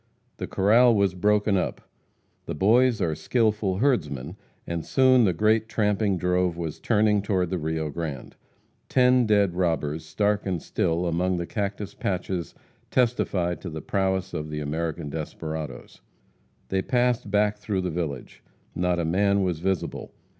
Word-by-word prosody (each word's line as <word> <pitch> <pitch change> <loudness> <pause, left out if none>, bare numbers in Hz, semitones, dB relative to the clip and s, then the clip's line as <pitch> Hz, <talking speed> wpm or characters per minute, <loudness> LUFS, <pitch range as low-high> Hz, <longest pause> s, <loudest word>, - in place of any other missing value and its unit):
The - - -4
corral 115 +5 +4
was 100 -2 +2
broken 105 +2 +2
up. - - -2 0.7
The - - -3
Boys 115 +7 +3
are 80 - 0
skillful 105 +3 0
herdsmen, 90 - 0 0.3
and 85 -1 -3
soon 130 -3 +4
the 95 - +3
great 110 +5 +2
tramping 105 -2 +1
drove 90 -1 0
was 80 -3 -5
turned 105 -2 +2
toward 95 -4 0
the 90 - -1
Rio 80 -1 -2
Grande. 75 -5 -6 0.5
Ten 125 -2 +4
dead 100 -4 +3
robbers, 80 -3 -1
stark 100 +6 0
and 90 -3 -1
still, 85 +2 -1
among 90 +2 0
the 85 - -2
cactus 100 +1 -4
patches, 90 -3 -3 0.3
testified 100 -8 0
to 90 - -6
the 80 -1 -7
prowess 95 -1 -1
of 75 0 -4
the 75 0 -4
American 80 +1 -3
desperadoes. 80 -1 -6 0.7
They 95 0 +1
passed 125 -1 0
back 105 +1 +2
through 100 -2 -2
the 90 -1 -2
village. 80 -6 -5 0.3
Not 90 0 0
a 85 - 0
man 100 +4 +2
was 90 -4 -1
visible. 95 0 -3
95 Hz, 150 wpm, -25 LUFS, 85-105 Hz, 0.7 s, corral